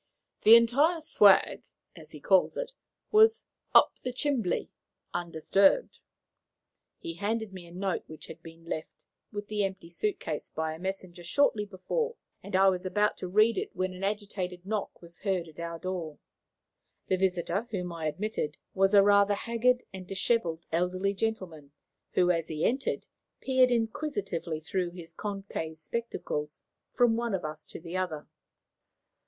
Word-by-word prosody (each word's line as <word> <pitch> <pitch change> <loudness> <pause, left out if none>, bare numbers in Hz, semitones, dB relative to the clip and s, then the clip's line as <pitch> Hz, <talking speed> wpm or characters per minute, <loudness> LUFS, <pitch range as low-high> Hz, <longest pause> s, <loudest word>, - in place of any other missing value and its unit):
"The 220 +2 +9
'entire 275 +9 +4
swag,' 205 -10 +5 0.3
as - - -13
he - - -10
calls - - +3
it, - - -3 0.4
was 440 +1 +6 0.3
'up - - +7
the 250 - -3
chimbly,' 255 -6 -1 0.4
undisturbed." 175 - +2 1.0
He 335 -1 -6
handed 220 -2 -2
me 180 -2 -9
a - - -14
note 190 +1 -2
which 155 -1 -8
had 160 - -11
been 165 0 -13
left, 160 -1 -4 0.4
with 205 -1 -5
the 210 -1 0
empty 190 -3 -4
suit 205 +5 -1
case, 155 -2 -5
by 160 0 -2
a 160 - -9
messenger, 185 -1 -5
shortly 210 +2 +2
before, 455 - -2 0.3
and 200 -1 -5
I 195 +1 +6
was 185 -1 -1
about 205 +3 +1
to 185 - -5
read 215 +3 +4
it - - -6
when 185 0 -1
an 185 +1 -8
agitated 195 -3 -3
knock 205 -3 -3
was 170 0 -12
heard 190 -4 -1
at 160 0 -14
our 170 0 -4
door. 170 -4 -4 0.9
The 190 - +2
visitor, 190 +4 0
whom 180 -5 -3
I 160 -2 -3
admitted, 170 -3 -3 0.2
was 195 +1 +3
a 200 - +8
rather 200 0 +5
haggard 240 +3 +1
and 185 -1 -8
dishevelled 185 -4 0
elderly 185 +4 0
gentleman, 185 -9 -4 0.4
who, 180 -1 +4
as 165 -2 -1
he 155 -1 -2
entered, 265 +3 0 0.3
peered 260 -1 +4
inquisitively 220 - -2
through 180 +2 -1
his 170 -2 -10
concave 195 -5 -5
spectacles 155 -6 -4 0.3
from 240 -2 +3
one 235 -3 0
of 180 - -4
us 155 0 -6
to - - -8
the 170 +2 -5
other. 160 -5 -3
190 Hz, 160 wpm, -29 LUFS, 170-220 Hz, 1.0 s, The